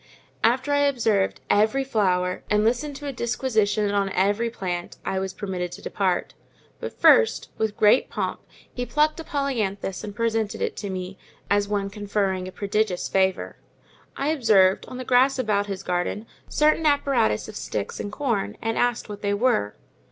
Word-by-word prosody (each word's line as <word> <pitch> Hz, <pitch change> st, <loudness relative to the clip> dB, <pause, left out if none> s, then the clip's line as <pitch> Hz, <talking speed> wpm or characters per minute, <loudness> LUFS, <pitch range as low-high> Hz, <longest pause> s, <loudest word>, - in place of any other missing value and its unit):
After 255 Hz, +5 st, +2 dB
I 285 Hz, -, +3 dB
had 285 Hz, -1 st, +2 dB
observed 215 Hz, -5 st, +1 dB
every 220 Hz, +6 st, +3 dB
flower, 185 Hz, -7 st, 0 dB
and 210 Hz, 0 st, +3 dB
listened 250 Hz, +6 st, 0 dB
to 290 Hz, +1 st, -8 dB
a 280 Hz, -, -3 dB
disquisition 220 Hz, -4 st, 0 dB
on 200 Hz, -1 st, +1 dB
every 205 Hz, +5 st, +1 dB
plant, 180 Hz, -6 st, -5 dB
I 190 Hz, -, -1 dB
was 190 Hz, 0 st, -3 dB
permitted 185 Hz, -4 st, -4 dB
to -, -, -9 dB
depart; 185 Hz, -3 st, -1 dB, 0.5 s
but -, -, -7 dB
first, 470 Hz, -1 st, +5 dB
with 220 Hz, -1 st, -1 dB
great 210 Hz, +4 st, +4 dB
pomp, -, -, -3 dB, 0.3 s
he 245 Hz, -, -3 dB
plucked 300 Hz, +5 st, +1 dB
a -, -, -5 dB
polyanthus 220 Hz, -, -2 dB
and 205 Hz, -1 st, -7 dB
presented 225 Hz, -1 st, -1 dB
it -, -, -2 dB
to 205 Hz, -, -4 dB
me, 185 Hz, 0 st, -5 dB, 0.3 s
as 205 Hz, 0 st, +3 dB
one 200 Hz, -1 st, -2 dB
conferring 200 Hz, -3 st, -1 dB
a -, -, -7 dB
prodigious 200 Hz, -1 st, -1 dB
favour. 190 Hz, -1 st, 0 dB, 0.6 s
I 275 Hz, -, 0 dB
observed, 215 Hz, -10 st, +4 dB
on 255 Hz, -, -8 dB
the 255 Hz, -, -6 dB
grass 255 Hz, +2 st, +4 dB
about 210 Hz, -5 st, 0 dB
his 195 Hz, -1 st, -5 dB
garden, 180 Hz, +4 st, -2 dB, 0.2 s
certain 305 Hz, +1 st, +3 dB
apparatus 275 Hz, -, +2 dB
of -, -, -9 dB
sticks 100 Hz, -2 st, -4 dB
and 205 Hz, -, -4 dB
corn, 230 Hz, -6 st, -2 dB
and 225 Hz, 0 st, -2 dB
asked 245 Hz, -1 st, 0 dB
what 205 Hz, -1 st, -8 dB
they 205 Hz, 0 st, 0 dB
were. 215 Hz, -, +1 dB
210 Hz, 175 wpm, -24 LUFS, 195-250 Hz, 0.6 s, first